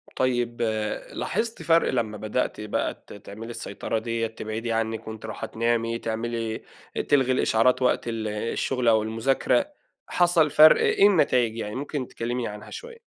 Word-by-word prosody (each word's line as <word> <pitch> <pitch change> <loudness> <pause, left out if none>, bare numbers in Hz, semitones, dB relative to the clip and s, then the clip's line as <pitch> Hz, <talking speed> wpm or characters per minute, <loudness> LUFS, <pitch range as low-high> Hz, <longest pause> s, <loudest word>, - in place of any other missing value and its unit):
طيب 120 -2 0 0.5
لاحظتِ 230 0 -2
فرْق 165 0 +3
لما 110 -4 -1
بدأتِ 110 +2 -2
بقى 105 -1 -3
ت - - -11
تعملي 105 +3 -9
السيطرة 115 -1 -4
ديّة 115 0 -2
تبعدي 110 +1 -5
عنِّك 115 0 -2
وأنتِ 110 0 -7
رايحة 110 - -5
تنامي 115 0 0
تعملي 115 0 -3 0.5
تلغي 130 -3 +4
الإشعارات 125 0 +3
وقت 125 - +2
الشغل 115 +3 -2
أو 110 -2 +5
المذاكرة 115 - +1 0.4
حصل 175 -3 +3
فرْق 155 +2 +7
إيه 200 - +5
النتايج 125 - +2
يعني 105 -2 -4
ممكن 140 -1 -4
تكلميني 120 +1 -3
عنها 105 0 -8
شوية؟ 475 0 -9
115 Hz, 140 wpm, -25 LUFS, 110-130 Hz, 0.5 s, فرْق